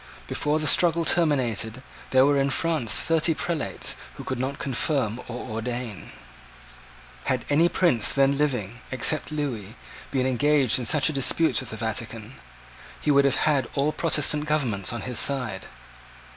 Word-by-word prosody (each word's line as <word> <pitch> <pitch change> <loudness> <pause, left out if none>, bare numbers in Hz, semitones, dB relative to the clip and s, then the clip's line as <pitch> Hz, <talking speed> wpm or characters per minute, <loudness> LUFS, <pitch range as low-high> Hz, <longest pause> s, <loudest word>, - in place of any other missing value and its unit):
Before 150 +1 -1
the 155 - -2
struggle 170 +1 +4
terminated, 130 -8 +1 0.3
there 130 0 +5
were 145 0 +3
in 135 0 +1
France 145 -4 -1
thirty 165 +8 +2
prelates 165 -3 -3 0.2
who - - -8
could 130 - -4
not 135 +2 -3
confirm 125 -3 -1
or 125 +2 -7
ordain. 115 -1 -5 1.1
Had 130 -3 -1
any 165 +4 +4
prince 130 - +2
then 140 0 +2
living, 125 -6 -2
except 140 +5 +1
Lewis, 125 -8 -4 0.3
been 130 -2 -1
engaged 130 -1 +2
in 120 - -3
such 150 -3 +3
a - - -3
dispute 145 +4 +2
with 130 - -6
the 110 - -6
Vatican, 110 +1 -4 0.7
he 150 - 0
would 140 0 +4
have 140 -1 +1
had 140 -5 +1
all 145 +2 +1
Protestant 150 -2 +1
governments 125 -11 0
on 120 - -5
his 125 -3 0
side. 125 -9 +1
135 Hz, 155 wpm, -25 LUFS, 120-150 Hz, 1.1 s, there